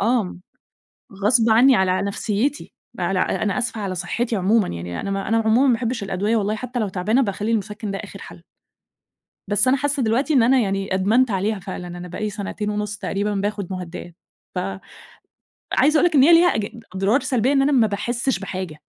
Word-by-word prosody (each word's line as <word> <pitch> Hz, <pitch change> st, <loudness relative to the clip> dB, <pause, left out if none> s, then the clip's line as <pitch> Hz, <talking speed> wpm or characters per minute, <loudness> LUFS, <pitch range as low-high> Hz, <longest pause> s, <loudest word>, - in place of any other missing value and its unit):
آه. 220 Hz, -5 st, 0 dB, 0.9 s
غصب 225 Hz, +1 st, +4 dB
عني 250 Hz, +4 st, +6 dB
على 190 Hz, -2 st, +2 dB
نفْسيتي، 210 Hz, +7 st, -2 dB, 0.3 s
على -, -, 0 dB
أنا 205 Hz, +3 st, 0 dB
أسفة 230 Hz, -3 st, -2 dB
على 190 Hz, -2 st, -3 dB
صحتي 225 Hz, +6 st, -2 dB
عمومًا 205 Hz, +3 st, +2 dB
يعني، 85 Hz, 0 st, -5 dB
أنا 200 Hz, -, -4 dB
ما 195 Hz, 0 st, -3 dB
أنا 225 Hz, -, +2 dB
عمومًا 225 Hz, +5 st, +3 dB
ما 250 Hz, -, +4 dB
باحبش 230 Hz, -1 st, -2 dB
الأدوية 200 Hz, +4 st, -1 dB
والله، 210 Hz, 0 st, 0 dB
حتى 250 Hz, +2 st, -5 dB
لو 210 Hz, -, -1 dB
تعبانة 205 Hz, +8 st, +1 dB
باخلّي 210 Hz, 0 st, -2 dB
المُسَكِّن 210 Hz, -1 st, -3 dB
ده 195 Hz, -, -3 dB
آخر -, -, -9 dB
حَل. -, -, -11 dB, 1.1 s
بس 205 Hz, +4 st, +2 dB
أنا 265 Hz, -, +4 dB
حاسة 285 Hz, -1 st, 0 dB
دلوقتي 250 Hz, +8 st, +1 dB
إن 255 Hz, -5 st, +5 dB
أنا 260 Hz, +2 st, +4 dB
يعني 195 Hz, -3 st, -1 dB
أدمنت 220 Hz, +6 st, +2 dB
عليها 200 Hz, +2 st, -1 dB
فعلًا، 180 Hz, 0 st, -7 dB
أنا 175 Hz, 0 st, -8 dB
بقى 180 Hz, -, -7 dB
لي 215 Hz, -, -1 dB
سنتين 210 Hz, +1 st, -4 dB
ونُص 210 Hz, 0 st, -3 dB
تقريبًا 200 Hz, +2 st, -2 dB
باخد 200 Hz, -1 st, -2 dB
مهدئات، 175 Hz, -1 st, -7 dB, 0.4 s
ف 180 Hz, -, 0 dB, 1.1 s
عايزة 305 Hz, +1 st, +3 dB
أقول -, -, +3 dB
لك 330 Hz, -, -11 dB
إن 275 Hz, -, +6 dB
هي 330 Hz, +5 st, +6 dB
ليها 345 Hz, +2 st, +7 dB
أج 215 Hz, -2 st, -1 dB, 0.3 s
أضرار 195 Hz, +8 st, +2 dB
سلبية، 255 Hz, 0 st, +1 dB
إن 270 Hz, -1 st, +3 dB
أنا 290 Hz, -, +2 dB
ما 240 Hz, -5 st, +4 dB
باحسش 235 Hz, +3 st, -1 dB
بحاجة، 185 Hz, -5 st, -6 dB
210 Hz, 195 wpm, -22 LUFS, 195-245 Hz, 1.1 s, ليها